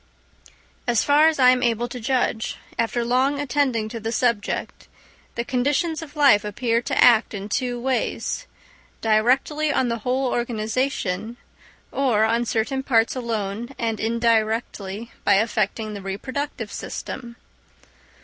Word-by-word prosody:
As 235 Hz, -3 st, +3 dB
far 295 Hz, +2 st, +5 dB
as 320 Hz, -, +2 dB
I 255 Hz, -2 st, +7 dB
am 255 Hz, 0 st, +1 dB
able 235 Hz, 0 st, +1 dB
to 245 Hz, +1 st, -7 dB
judge, 240 Hz, -2 st, -1 dB, 0.2 s
after 235 Hz, +1 st, 0 dB
long 260 Hz, +4 st, +2 dB
attending 265 Hz, -5 st, 0 dB
to 230 Hz, 0 st, -6 dB
the 225 Hz, +1 st, -3 dB
subject, 235 Hz, -4 st, -1 dB, 0.5 s
the 235 Hz, -, -2 dB
conditions 290 Hz, +6 st, 0 dB
of 310 Hz, -2 st, -10 dB
life 280 Hz, -8 st, +5 dB
appear 230 Hz, +3 st, 0 dB
to -, -, -3 dB
act 230 Hz, -2 st, +5 dB
in 200 Hz, 0 st, -5 dB
two 245 Hz, +2 st, -1 dB
ways—directly 265 Hz, -, -1 dB
on 260 Hz, -3 st, +1 dB
the 235 Hz, 0 st, -2 dB
whole 255 Hz, +4 st, 0 dB
organisation 230 Hz, -2 st, -2 dB, 0.5 s
or 250 Hz, -6 st, +2 dB
on 230 Hz, +2 st, +2 dB
certain 235 Hz, +4 st, -1 dB
parts 230 Hz, -3 st, +2 dB
alone 230 Hz, 0 st, -3 dB
and 225 Hz, -3 st, -2 dB
in 230 Hz, +1 st, -1 dB
directly 225 Hz, -2 st, 0 dB
by 200 Hz, -, +4 dB
affecting 215 Hz, 0 st, 0 dB
the 200 Hz, -, -6 dB
reproductive 260 Hz, +10 st, -4 dB
system. 240 Hz, -3 st, -6 dB
235 Hz, 135 wpm, -23 LUFS, 220-260 Hz, 0.5 s, I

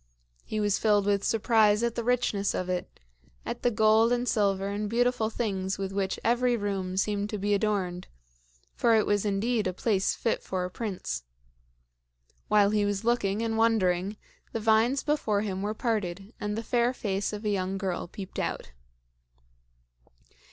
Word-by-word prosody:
He 215 Hz, -, -3 dB
was 205 Hz, -2 st, +1 dB
filled 205 Hz, -2 st, +3 dB
with 200 Hz, -1 st, +1 dB
surprise 220 Hz, -1 st, +3 dB
at 235 Hz, -1 st, +1 dB
the 235 Hz, -, -3 dB
richness 235 Hz, -5 st, +1 dB
of 185 Hz, -, -3 dB
it 180 Hz, 0 st, -4 dB, 0.5 s
at 240 Hz, 0 st, -4 dB
the 245 Hz, -, +3 dB
gold 220 Hz, +1 st, +4 dB
and 245 Hz, 0 st, 0 dB
silver 200 Hz, -4 st, +1 dB
and 205 Hz, +1 st, -3 dB
beautiful 245 Hz, -1 st, +1 dB
things 195 Hz, -4 st, -2 dB
with 195 Hz, -1 st, -3 dB
which 195 Hz, -1 st, -1 dB
every 245 Hz, +1 st, +2 dB
room 195 Hz, -3 st, -3 dB
seemed 205 Hz, +1 st, 0 dB
to 210 Hz, -, -3 dB
be 205 Hz, +1 st, 0 dB
adorned 195 Hz, -4 st, -1 dB, 0.7 s
for 230 Hz, -2 st, +3 dB
it 215 Hz, -, +3 dB
was 205 Hz, 0 st, +1 dB
indeed 210 Hz, +2 st, 0 dB
a 185 Hz, -, -2 dB
place 195 Hz, 0 st, 0 dB
fit 230 Hz, -, -1 dB
for 185 Hz, -1 st, -3 dB
a 180 Hz, -, -6 dB
prince. 205 Hz, -2 st, -4 dB, 1.3 s
While 210 Hz, -1 st, +4 dB
he 210 Hz, -1 st, +2 dB
was 205 Hz, 0 st, -1 dB
looking 225 Hz, -3 st, +1 dB
and 225 Hz, -1 st, -1 dB
wondering, 200 Hz, -3 st, +2 dB, 0.4 s
the 225 Hz, -, -1 dB
vines 225 Hz, +5 st, +3 dB
before 230 Hz, -9 st, +1 dB
him 190 Hz, -3 st, -3 dB
were 210 Hz, +2 st, -2 dB
parted 205 Hz, -3 st, -2 dB
and 210 Hz, 0 st, -3 dB
the 225 Hz, -, -3 dB
fair 240 Hz, +2 st, +1 dB
face 200 Hz, -3 st, -2 dB
of 210 Hz, +1 st, -6 dB
a -, -, +1 dB
young 190 Hz, -1 st, -1 dB
girl 190 Hz, -3 st, -3 dB
peeped 190 Hz, +1 st, -8 dB
out. -, -, -3 dB
210 Hz, 170 wpm, -28 LUFS, 195-225 Hz, 1.3 s, gold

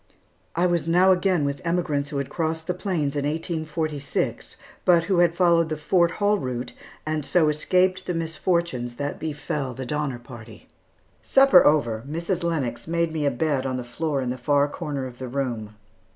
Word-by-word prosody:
I 175 Hz, +2 st, +2 dB
was 175 Hz, -2 st, +1 dB
now 180 Hz, +3 st, +5 dB
again 180 Hz, -4 st, +2 dB
with 140 Hz, 0 st, -3 dB
emigrants 165 Hz, -5 st, -1 dB
who 145 Hz, -, -4 dB
had 140 Hz, -1 st, -2 dB
crossed 160 Hz, -1 st, -2 dB
the 180 Hz, -, -1 dB
plains 175 Hz, -7 st, -2 dB
in 145 Hz, -, -1 dB
1846, 155 Hz, -1 st, -3 dB, 0.3 s
but 170 Hz, -2 st, +5 dB
who 185 Hz, 0 st, +1 dB
had 170 Hz, -1 st, +4 dB
followed 170 Hz, -2 st, +3 dB
the 155 Hz, -, -2 dB
Fort 170 Hz, +3 st, +2 dB
Hall 205 Hz, 0 st, +1 dB
route 125 Hz, -2 st, -4 dB, 0.3 s
and 155 Hz, -1 st, -1 dB
so 160 Hz, +1 st, +3 dB
escaped 185 Hz, +5 st, +1 dB
the 180 Hz, -, -1 dB
misfortunes 165 Hz, -6 st, -1 dB
that 145 Hz, +2 st, -4 dB
befell 145 Hz, -4 st, -3 dB
the 130 Hz, -, -5 dB
Donner 145 Hz, -1 st, -2 dB
Party. 120 Hz, -3 st, -12 dB, 0.5 s
Supper 270 Hz, -8 st, +6 dB
over, 120 Hz, -8 st, +2 dB
Mrs. 170 Hz, +3 st, -2 dB
Lennox 140 Hz, -9 st, -2 dB
made 170 Hz, -1 st, 0 dB
me 150 Hz, -2 st, 0 dB
a -, -, +5 dB
bed 135 Hz, 0 st, -1 dB
on 130 Hz, -1 st, -2 dB
the 125 Hz, -, -4 dB
floor 140 Hz, +3 st, -2 dB
in 125 Hz, -1 st, -2 dB
the 130 Hz, -, -5 dB
far 145 Hz, +3 st, +2 dB
corner 145 Hz, -3 st, -4 dB
of 125 Hz, -1 st, -9 dB
the 130 Hz, -, -5 dB
room. 120 Hz, -5 st, -3 dB
155 Hz, 180 wpm, -24 LUFS, 135-170 Hz, 0.5 s, Supper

